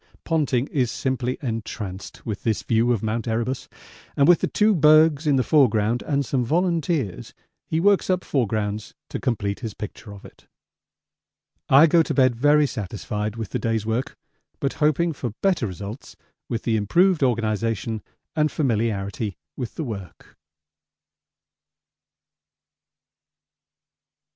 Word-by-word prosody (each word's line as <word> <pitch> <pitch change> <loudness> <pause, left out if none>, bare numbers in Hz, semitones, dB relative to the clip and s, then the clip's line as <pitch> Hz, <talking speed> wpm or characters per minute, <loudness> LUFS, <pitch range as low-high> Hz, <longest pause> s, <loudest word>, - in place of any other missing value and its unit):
Ponting 145 -6 +1
is 130 -6 0
simply 130 0 -2
entranced 110 -5 -5
with 105 -3 -4
this 110 -3 -1
view 115 +1 +2
of 115 -4 0
Mt. 110 +1 -2
Erebus, 120 +3 -2 0.5
and 140 - +4
with 175 -1 +6
the - - +1
two 215 +1 +3
bergs 155 -2 +5
in 145 - +4
the 130 - +2
foreground 120 -6 +3
and 140 -2 -1
some 125 0 0
volunteers 160 - -1 0.3
he 160 - 0
works 200 +2 +3
up 185 -1 +1
foregrounds 110 -5 -2
to - - -4
complete 100 -5 -2
his 110 -4 -6
picture 105 0 -8
of 100 -1 -12
it. - - -16 1.2
I 140 +4 +8
go 165 +1 +5
to - - -2
bed 130 -3 +4
very 145 +4 +4
satisfied 105 -2 -4
with 110 -4 -5
the - - -1
day's 115 -2 -1
work, 115 +4 -2 0.4
but 140 - -1
hoping 155 +3 +2
for 125 -6 -5
better 185 - +2
results 100 +6 -8 0.3
with 115 - -3
the 115 -2 +1
improved 175 - +3
organisation 115 -3 0 0.3
and 155 -1 +2
familiarity 110 - -1 0.2
with 125 -4 -6
the 160 - -3
work. 100 - -8
120 Hz, 135 wpm, -23 LUFS, 110-150 Hz, 1.2 s, I